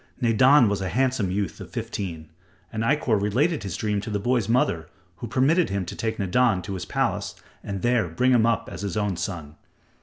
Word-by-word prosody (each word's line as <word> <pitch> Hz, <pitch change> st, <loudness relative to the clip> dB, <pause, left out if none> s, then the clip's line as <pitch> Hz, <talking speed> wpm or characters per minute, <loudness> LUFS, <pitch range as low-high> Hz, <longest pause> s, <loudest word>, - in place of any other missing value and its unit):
Nadan 125 Hz, +2 st, +5 dB
was 100 Hz, -1 st, -1 dB
a 95 Hz, -, -2 dB
handsome 125 Hz, -1 st, +1 dB
youth 100 Hz, +1 st, -3 dB
of -, -, -9 dB
fifteen, 80 Hz, -6 st, -5 dB, 0.4 s
and 110 Hz, -, -2 dB
Ikkor 115 Hz, -4 st, +1 dB
related 140 Hz, -, +1 dB
his 95 Hz, -4 st, -5 dB
dream 105 Hz, -2 st, -1 dB
to 105 Hz, -, -6 dB
the 105 Hz, -, -1 dB
boy's 115 Hz, 0 st, 0 dB
mother 85 Hz, -9 st, +1 dB, 0.3 s
who 120 Hz, -, -6 dB
permitted 140 Hz, -, +2 dB
him 100 Hz, -1 st, -2 dB
to -, -, -7 dB
take 110 Hz, 0 st, -2 dB
Nadan 100 Hz, 0 st, +2 dB
to 100 Hz, -, -5 dB
his 95 Hz, -, -5 dB
palace -, -, -1 dB, 0.3 s
and 100 Hz, -2 st, -5 dB
there 120 Hz, -5 st, +2 dB
bring 125 Hz, +11 st, +1 dB
him 115 Hz, -2 st, +4 dB
up 115 Hz, -3 st, 0 dB
as 85 Hz, -, -7 dB
his 100 Hz, +1 st, -3 dB
own 105 Hz, -3 st, 0 dB
son. 80 Hz, -4 st, -5 dB
105 Hz, 205 wpm, -25 LUFS, 95-125 Hz, 0.4 s, Nadan